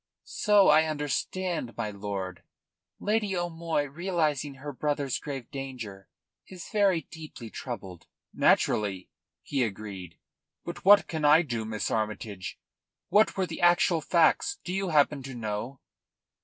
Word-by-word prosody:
"So 205 -2 +4
I 155 +1 +6
understand, 155 - -2
my 110 -3 -2
lord. 100 -3 -5 0.6
Lady 210 -2 0
O'Moy, 165 -3 -1
realising 150 -2 -1
her 145 +2 -7
brother's 145 -1 -1
grave 135 -4 -6
danger, 125 -8 -7 0.4
is 185 -3 -9
very 200 -5 +3
deeply 155 -8 -9
troubled." 95 -8 -7 0.3
"Naturally," 95 -3 +2 0.3
he 135 -3 0
agreed. 95 -5 -6 0.5
"But 170 - -7
what 205 +1 +7
can 160 -2 -4
I 150 +3 +6
do, 120 -7 -3
Miss 110 -1 -3
Armytage? 105 -3 -3 0.5
What 210 0 +4
were 190 - +1
the - - -7
actual 175 -1 +4
facts, 170 - +3
do 180 - -4
you 195 -1 -1
happen 150 -2 +3
to 135 0 -8
know?" 115 +3 -4
145 Hz, 130 wpm, -28 LUFS, 110-175 Hz, 0.6 s, what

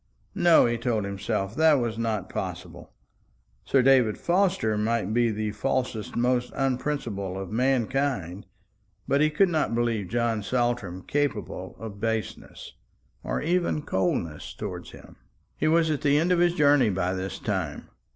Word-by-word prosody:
No, 170 -2 +5
he 120 -1 0
told 115 -4 -1
himself, 100 +1 -3
that 160 +1 +5
was 120 -4 -1
not 110 -4 -1
possible. - - -6 0.7
Sir 135 -2 +3
David 125 -5 +4
Forster 180 - +1
might 110 -1 0
be 120 0 +3
the 110 0 -2
falsest, 120 -1 -2
most 125 +1 +1
unprincipled 125 -8 -2
of 95 0 -6
mankind; 125 -6 0 0.6
but 140 +1 +2
he 155 - +4
could 180 +5 +3
not 155 -8 0
believe 115 -4 0
John 115 0 0
Saltram 120 -6 -1
capable 145 0 -2
of 110 -3 -8
baseness, 115 -1 -4 0.5
or - - -2
even 170 -2 0
coldness, 90 - -2
towards - - -6
him. - - -14 0.4
He - - 0
was 160 0 +3
at 150 - -2
the 145 -1 +3
end 170 +4 +2
of 180 - +3
his 175 0 +3
journey 145 -6 +4
by 90 -1 -1
this 95 +1 -4
time. 95 -9 -3
120 Hz, 150 wpm, -26 LUFS, 105-145 Hz, 0.7 s, No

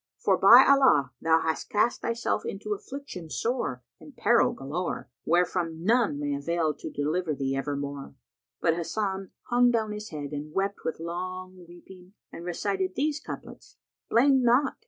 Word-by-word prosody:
For, - - +2
by - - +8
Allah, 260 - +5
thou 165 0 +3
hast 160 -1 -2
cast 235 +1 +1
thyself 230 0 -1
into 210 +2 -4
affliction 205 - -8
sore 155 - -2 0.2
and 285 -4 -15
peril 235 0 +4
galore, 155 +7 -4
wherefrom 170 -1 0
none 220 -7 +2
may 145 -1 -2
avail 155 +2 0
to - - -8
deliver 155 +2 -1
thee 135 -1 -2
evermore!" 140 0 -4 0.4
But 165 - +2
Hasan 190 +2 -3 0.2
hung 245 0 +5
down 220 -3 0
his 210 +1 -6
head 145 -2 -6
and 150 +1 -6
wept 195 +1 -1
with 160 - -3
long 185 +2 -6
weeping 180 +2 -15 0.2
and 170 - -9
recited 190 +1 -2
these 300 +1 0
couplets, - - -10 0.3
"'Blame 265 +2 +4
not!' 250 +3 +3
180 Hz, 155 wpm, -27 LUFS, 155-225 Hz, 0.4 s, by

